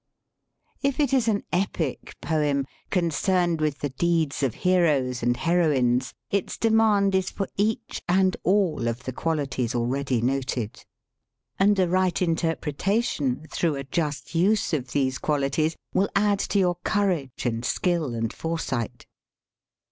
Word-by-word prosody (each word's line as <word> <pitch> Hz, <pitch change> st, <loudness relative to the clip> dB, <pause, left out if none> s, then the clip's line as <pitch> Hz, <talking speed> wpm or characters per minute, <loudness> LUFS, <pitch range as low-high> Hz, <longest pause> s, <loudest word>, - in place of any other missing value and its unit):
If 275 Hz, -1 st, 0 dB
it 285 Hz, -3 st, +2 dB
is 255 Hz, -4 st, +3 dB
an 205 Hz, -2 st, +1 dB
epic 175 Hz, -6 st, -2 dB
poem, 145 Hz, -4 st, 0 dB, 0.2 s
concerned 175 Hz, -1 st, +1 dB
with 150 Hz, -2 st, 0 dB
the 145 Hz, -, -1 dB
deeds 165 Hz, 0 st, 0 dB
of 135 Hz, -5 st, 0 dB
heroes 150 Hz, -9 st, +2 dB
and 120 Hz, +1 st, +1 dB
heroines, 145 Hz, -8 st, +2 dB, 0.2 s
its 200 Hz, -2 st, -1 dB
demand 220 Hz, -3 st, +3 dB
is 190 Hz, -1 st, +1 dB
for 195 Hz, -, -3 dB
each 220 Hz, +3 st, -1 dB
and 185 Hz, +1 st, +3 dB
all 180 Hz, -, +1 dB
of 115 Hz, +2 st, -3 dB
the 130 Hz, -, -4 dB
qualities 135 Hz, -6 st, -1 dB
already 125 Hz, +1 st, 0 dB
noted. 125 Hz, -2 st, -2 dB, 0.8 s
And 200 Hz, +1 st, +4 dB
a 185 Hz, -2 st, +3 dB
right 185 Hz, 0 st, +1 dB
in 170 Hz, -3 st, +2 dB
terpretation, 160 Hz, -, -1 dB
through 165 Hz, -4 st, 0 dB
a 140 Hz, -, -4 dB
just 150 Hz, +2 st, -3 dB
use 195 Hz, +4 st, +2 dB
of 130 Hz, -5 st, -2 dB
these 130 Hz, -2 st, 0 dB
qualities, 150 Hz, +2 st, 0 dB, 0.2 s
will 195 Hz, -, +2 dB
add 200 Hz, 0 st, +3 dB
to -, -, +1 dB
your 180 Hz, -3 st, +2 dB
courage 180 Hz, -, -1 dB
and 115 Hz, -1 st, -1 dB
skill 160 Hz, -2 st, 0 dB
and 115 Hz, -1 st, -2 dB
foresight. 160 Hz, -8 st, -3 dB
165 Hz, 140 wpm, -25 LUFS, 135-190 Hz, 0.8 s, And